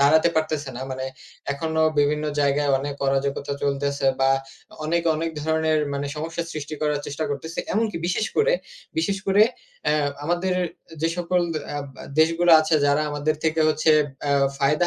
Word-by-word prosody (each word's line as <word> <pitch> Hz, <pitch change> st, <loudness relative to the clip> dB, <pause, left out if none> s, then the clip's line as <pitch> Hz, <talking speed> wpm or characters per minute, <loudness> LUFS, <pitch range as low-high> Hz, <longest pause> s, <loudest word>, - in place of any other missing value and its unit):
দাঁড়াতে 155 Hz, +4 st, +5 dB
পারতেছে 155 Hz, -2 st, 0 dB
না। -, -, -6 dB
মানে 130 Hz, 0 st, -3 dB, 0.5 s
এখনও 160 Hz, +2 st, 0 dB
বিভিন্ন 150 Hz, +1 st, +2 dB, 0.2 s
জায়গায় 145 Hz, 0 st, +2 dB
অনেক 140 Hz, +1 st, -4 dB
অরাজকতা 140 Hz, +1 st, 0 dB
চলতেছে 140 Hz, 0 st, 0 dB
বা 135 Hz, 0 st, +4 dB, 0.5 s
অনেক, 170 Hz, +2 st, +1 dB
অনেক 165 Hz, +1 st, -2 dB
ধরনের 160 Hz, 0 st, +1 dB, 0.2 s
মানে 140 Hz, +1 st, -2 dB
সমস্যা 165 Hz, +2 st, -3 dB
সৃষ্টি 155 Hz, 0 st, -5 dB
করার 150 Hz, -1 st, +1 dB
চেষ্টা 145 Hz, +2 st, -3 dB
করতেছে। 160 Hz, +4 st, -5 dB
এমনকি 215 Hz, -2 st, 0 dB
বিশেষ 185 Hz, +5 st, 0 dB
করে 475 Hz, +3 st, +4 dB, 0.5 s
বিশেষ 200 Hz, -11 st, 0 dB
করে 195 Hz, +2 st, +5 dB, 0.4 s
অ্যা 150 Hz, -, +3 dB, 0.3 s
আমাদের 175 Hz, +3 st, 0 dB, 0.4 s
এ -, -, -11 dB
যে 165 Hz, -, +3 dB
সকল 180 Hz, 0 st, +1 dB, 0.4 s
আব 145 Hz, -, -4 dB, 0.2 s
আ -, -, -8 dB, 0.2 s
দেশগুলো 165 Hz, +2 st, +4 dB
আছে 155 Hz, +1 st, +1 dB
যারা 145 Hz, +2 st, +3 dB
আমাদের 145 Hz, +1 st, 0 dB
থেকে 160 Hz, 0 st, +1 dB
হচ্ছে 155 Hz, +1 st, +2 dB, 0.4 s
আ -, -, +2 dB, 0.3 s
ফায়দা 150 Hz, +5 st, +3 dB
155 Hz, 160 wpm, -24 LUFS, 145-165 Hz, 0.5 s, দাঁড়াতে